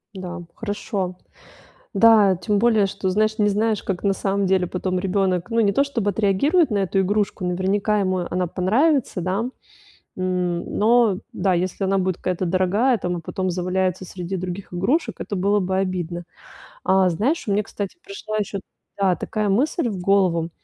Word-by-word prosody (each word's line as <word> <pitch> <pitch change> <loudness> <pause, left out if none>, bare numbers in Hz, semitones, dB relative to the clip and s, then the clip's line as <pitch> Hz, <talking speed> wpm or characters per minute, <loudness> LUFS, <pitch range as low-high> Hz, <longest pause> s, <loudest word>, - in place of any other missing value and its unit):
Да, 180 -2 -6
хорошо. 205 -4 -3 0.8
Да, 215 -4 +6
тем 200 +4 0
более, 220 -2 +4
что, 195 0 -3
знаешь, 215 +3 +1
не 210 -1 +3
знаешь, 215 +1 0
как 190 -1 -4
на 200 - +3
самом 195 0 -1
деле 185 -1 +2
потом 185 +1 -2
ребёнок, 185 0 0
ну, 230 0 +2
не 205 -3 +3
то 275 - +3
чтобы 235 -8 -1
отреагирует 225 - +2
на 210 - +1
эту 195 0 +1
игрушку, 205 0 0
наверняка 195 +4 0
ему 185 -2 0
она 180 +1 0
понравится, 225 - +1
да. 195 +7 -1 0.7
М 180 -2 -1
но, 225 -2 +4
да, 185 0 +1
если 185 +3 -1
она 195 +1 +2
будет 185 -1 0
какая-то 185 0 -2
дорогая 190 +8 +2
там, 180 -2 -2
а - - -5
потом 185 +3 -3
заваляется 185 +1 -1
среди 180 +1 -5
других 185 +1 -6
игрушек, 230 - 0
это 205 - -4
было 200 +3 +2
бы 190 0 -1
обидно. 175 -2 -2 0.6
А 190 -1 +4
знаешь, 230 - 0
мне, 205 +1 +2
кстати, 200 - -6
пришла 300 - -6
ещё 205 -1 -2 0.4
да, 190 -3 +2
такая 215 -1 -2
мысль 250 - +1
в 200 -4 -4
голову. 180 -3 +2
195 Hz, 170 wpm, -22 LUFS, 185-210 Hz, 0.8 s, Да